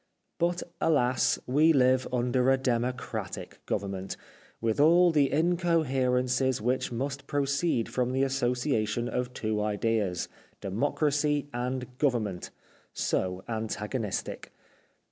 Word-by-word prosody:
But 175 Hz, +1 st, +1 dB, 0.2 s
alas, 130 Hz, -6 st, +2 dB
we 150 Hz, +6 st, +4 dB
live 130 Hz, -1 st, +3 dB
under 125 Hz, +1 st, +1 dB
a 135 Hz, -, +5 dB
democratic 125 Hz, -1 st, -3 dB
government, 95 Hz, -1 st, -3 dB, 0.4 s
with 115 Hz, +1 st, -1 dB
all 170 Hz, +4 st, +6 dB
the 145 Hz, -4 st, +3 dB
incoherences 135 Hz, -7 st, +1 dB
which 125 Hz, +4 st, -1 dB
must 135 Hz, +3 st, -4 dB
proceed 140 Hz, -2 st, 0 dB
from 125 Hz, -1 st, -1 dB
the 135 Hz, +1 st, +1 dB
association 125 Hz, -3 st, 0 dB
of 125 Hz, 0 st, -2 dB
two 110 Hz, -1 st, -1 dB
ideas 105 Hz, -2 st, 0 dB, 0.2 s
— -, -, -34 dB
democracy 145 Hz, +7 st, 0 dB
and 125 Hz, +1 st, -4 dB
govern 125 Hz, -6 st, +2 dB
ment— 95 Hz, -4 st, -5 dB, 0.4 s
so 95 Hz, 0 st, -1 dB
antagonistic. 110 Hz, -1 st, -3 dB
125 Hz, 110 wpm, -28 LUFS, 115-140 Hz, 0.4 s, all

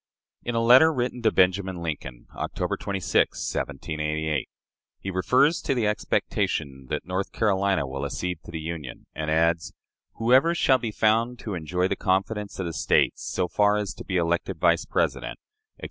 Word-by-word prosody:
In 120 Hz, -, -3 dB
a 115 Hz, -, +2 dB
letter 130 Hz, +7 st, +7 dB
written 125 Hz, -3 st, -2 dB
to 110 Hz, -, +3 dB
Benjamin 95 Hz, +1 st, +2 dB
Lincoln, 65 Hz, -7 st, -5 dB
October -, -, -2 dB
26, 95 Hz, -3 st, 0 dB, 0.2 s
1788, 75 Hz, 0 st, -2 dB, 0.5 s
he 95 Hz, -, -5 dB
refers 130 Hz, -, +3 dB
to 135 Hz, -, 0 dB
the 120 Hz, -3 st, +1 dB
expectation 70 Hz, -9 st, -1 dB
that -, -, -3 dB
North 95 Hz, +2 st, -3 dB
Carolina 100 Hz, -6 st, +1 dB
will 70 Hz, 0 st, -5 dB
accede 90 Hz, -2 st, -3 dB
to -, -, -11 dB
the 80 Hz, -1 st, -5 dB
Union, 80 Hz, -4 st, -6 dB
and 75 Hz, 0 st, -3 dB
adds, 80 Hz, +1 st, +1 dB, 0.4 s
"Whoever 130 Hz, +9 st, +4 dB
shall 130 Hz, -5 st, +4 dB
be 115 Hz, -, -3 dB
found 115 Hz, +3 st, +1 dB
to 105 Hz, -, -5 dB
enjoy 90 Hz, +2 st, -1 dB
the -, -, -1 dB
confidence 100 Hz, +2 st, -1 dB
of 95 Hz, -, -3 dB
the 85 Hz, -, -4 dB
States 70 Hz, -, +2 dB
so 90 Hz, -1 st, -1 dB
far 105 Hz, +3 st, +3 dB
as 105 Hz, 0 st, -2 dB
to -, -, -10 dB
be 95 Hz, -, -1 dB
elected 85 Hz, 0 st, 0 dB
Vice -, -, +3 dB
President," -, -, -1 dB, 0.4 s
etc. -, -, -35 dB
95 Hz, 170 wpm, -25 LUFS, 80-110 Hz, 0.5 s, letter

